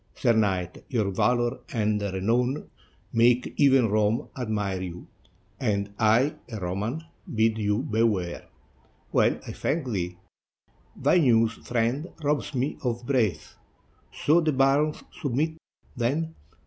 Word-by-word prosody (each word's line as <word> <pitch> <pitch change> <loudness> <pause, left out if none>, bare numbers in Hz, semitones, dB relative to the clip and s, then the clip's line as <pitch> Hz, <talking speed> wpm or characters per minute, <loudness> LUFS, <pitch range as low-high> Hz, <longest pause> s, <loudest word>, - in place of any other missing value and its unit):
Sir 120 -3 +3
knight, 95 -5 0
your 110 -7 0
valor 120 +5 +1
and 105 -2 0
renown 115 +8 0 0.4
make 120 +2 +3
even 135 -4 +5
Rome 105 +1 +1
admire 105 -6 -2
you; 90 -1 -7 0.5
and 100 -4 -1
I, 115 +6 +4 0.2
a 110 - -4
Roman, 100 - -3 0.3
bid 110 0 +2
you 105 +3 0
beware," 110 - 0 0.6
"Well, - - +3
I - - -6
thank 150 +1 -1
thee; 90 -3 -2 0.8
thy 180 - +3
news, 115 -6 +4
friend, 120 +8 -1 0.2
robs 150 0 0
me 130 +3 -1
of 120 -1 -2
breath. 120 -8 0 0.5
So 160 +4 +3
the 155 -2 +1
barons 140 +3 +2 0.2
submit, 155 +3 -1 0.4
then?" 145 +7 -1
115 Hz, 120 wpm, -26 LUFS, 105-135 Hz, 0.8 s, even